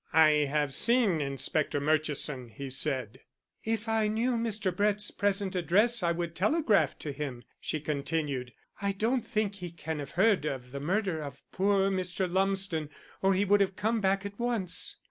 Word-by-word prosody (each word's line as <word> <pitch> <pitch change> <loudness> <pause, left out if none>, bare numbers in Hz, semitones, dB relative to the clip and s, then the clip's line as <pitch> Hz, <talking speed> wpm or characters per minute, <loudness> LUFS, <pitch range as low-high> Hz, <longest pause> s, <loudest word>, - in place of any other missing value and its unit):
"I 160 -1 +7 0.2
have 145 -1 0
seen 225 - +3
Inspector 140 +2 0
Murchison," 150 -4 0
he 135 +5 -7
said. 130 -5 0 0.4
"If 225 0 -2
I 220 -1 +2
knew 225 +4 0
Mr. 215 -6 -1
Brett's 205 +1 +1
present 200 -1 0
address 205 +7 +3
I 170 -1 +2
would 170 -1 -3
telegraph 215 - +2
to 150 - -5
him," 135 -4 -5 0.2
she 155 - -3
continued. 145 -3 -2 0.3
"I 200 0 0
don't 235 +6 0
think 210 -2 0
he 180 -2 -6
can 160 -1 -5
have 140 -1 -6
heard 195 -2 +3
of 125 -3 -5
the 140 - -5
murder 180 +1 -1
of 140 -2 -8
poor 195 0 +2
Mr. 185 0 -1
Lumsden, 190 -4 0 0.3
or 195 0 +3
he 200 +2 +2
would 205 +1 +4
have 195 -1 +1
come 220 +2 0
back 195 0 +1
at 200 +2 -7
once." 235 -7 -1
185 Hz, 170 wpm, -29 LUFS, 150-205 Hz, 0.4 s, I